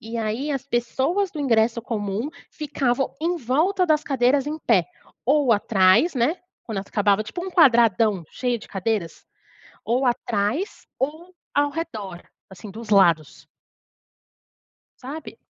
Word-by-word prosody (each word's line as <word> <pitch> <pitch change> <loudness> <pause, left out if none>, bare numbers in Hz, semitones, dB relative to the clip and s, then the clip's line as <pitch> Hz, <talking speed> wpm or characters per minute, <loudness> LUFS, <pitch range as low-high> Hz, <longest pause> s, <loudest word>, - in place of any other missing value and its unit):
E 225 +1 -7
aí, 225 +7 -2
as 270 -2 -3
pessoas 270 +11 0
do 305 - -6
ingresso 235 -3 +2
comum 215 +2 -3 0.2
ficavam 270 -4 -1
em 345 +2 0
volta 335 - +1
das 310 -1 +2
cadeiras 270 +1 +2
em 305 +1 -3
pé, 195 - +2 0.4
ou 275 -1 +3
atrás, 210 - +3
né, 265 +8 +1 0.3
quando 220 -4 -4
elas 195 - -6
acabava. 205 0 +2
Tipo 350 +12 -6
um 380 - -5
quadradão 230 - +4
cheio 245 -2 -1
de - - -14
cadeiras, 195 -3 -3 0.6
ou 250 +3 +1
atrás, 240 - -1
ou 315 +7 -4 0.2
ao 290 0 +2
redor, 220 - -6 0.3
assim, 190 +2 -10
dos 225 +1 -10
lados. 170 -7 +3 1.6
Sabe? 285 +5 -8
240 Hz, 135 wpm, -23 LUFS, 215-295 Hz, 1.6 s, quadradão